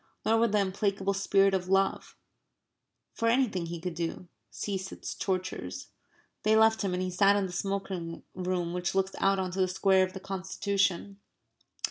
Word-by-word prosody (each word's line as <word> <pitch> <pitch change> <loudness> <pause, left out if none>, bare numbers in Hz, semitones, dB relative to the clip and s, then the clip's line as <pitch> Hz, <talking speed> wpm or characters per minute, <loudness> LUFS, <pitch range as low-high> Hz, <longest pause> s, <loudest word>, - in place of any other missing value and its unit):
Nor 225 +1 +4
would 230 -2 +3
the 210 - +3
implacable 195 0 0
spirit 195 0 +3
of 185 -1 0
love, 195 0 +1 1.0
for 230 - -1
anything 230 -8 +2
he 170 0 -5
could 180 +1 -4
do, 170 +1 -4 0.2
cease 190 -2 -4
its - - -6
tortures. 185 - -3 0.5
They 215 +1 +3
left 220 0 +5
him 190 -3 0
and 180 - -1
he 185 - -2
sat 200 +2 +4
in 200 -1 +1
the 185 - -5
smoking 190 -3 -3
room, 180 -2 -2
which 180 +1 -2
looks 190 0 +1
out 195 0 +3
on 185 -1 -2
to 190 - -5
the 185 - +3
Square 190 0 +3
of 185 - -14
the 190 - -6
Constitution. 195 0 -1
190 Hz, 175 wpm, -29 LUFS, 180-200 Hz, 1.0 s, left